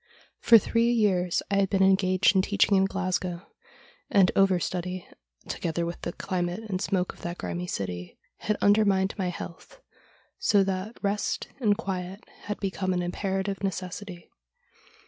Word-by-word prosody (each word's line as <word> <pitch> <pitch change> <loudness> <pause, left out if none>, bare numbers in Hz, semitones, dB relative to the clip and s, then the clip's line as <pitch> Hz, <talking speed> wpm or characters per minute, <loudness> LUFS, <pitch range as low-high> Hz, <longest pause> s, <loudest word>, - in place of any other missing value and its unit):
For 230 - +8
three 230 +2 +2
years 190 -6 +2
I 200 - +2
had 195 -1 +2
been 190 0 +3
engaged 190 +1 +4
in 190 - +5
teaching 200 +1 +2
in 190 0 +4
Glasgow, 185 -2 -2 0.6
and 195 -3 +5
over 195 -2 +4
study, 180 +1 -4 0.4
together 170 0 -2
with 170 +1 -5
the 170 - -3
climate 180 +1 -3
and 190 -3 -2
smoke 185 -3 0
of - - -18
that 175 +1 -5
grimy 180 +1 -4
city, 90 - -5 0.2
had 210 -1 -1
undermined 200 -2 +3
my 185 -2 0
health, 175 - -9 0.6
so 200 -2 +4
that 195 +4 -3
rest 205 +1 -1
and 210 -5 +2
quiet 190 -1 -5 0.2
had 210 0 -4
become 190 -1 -1
an 180 0 -1
imperative 195 +2 -2
necessity. 185 -1 -5
190 Hz, 150 wpm, -27 LUFS, 180-200 Hz, 0.6 s, For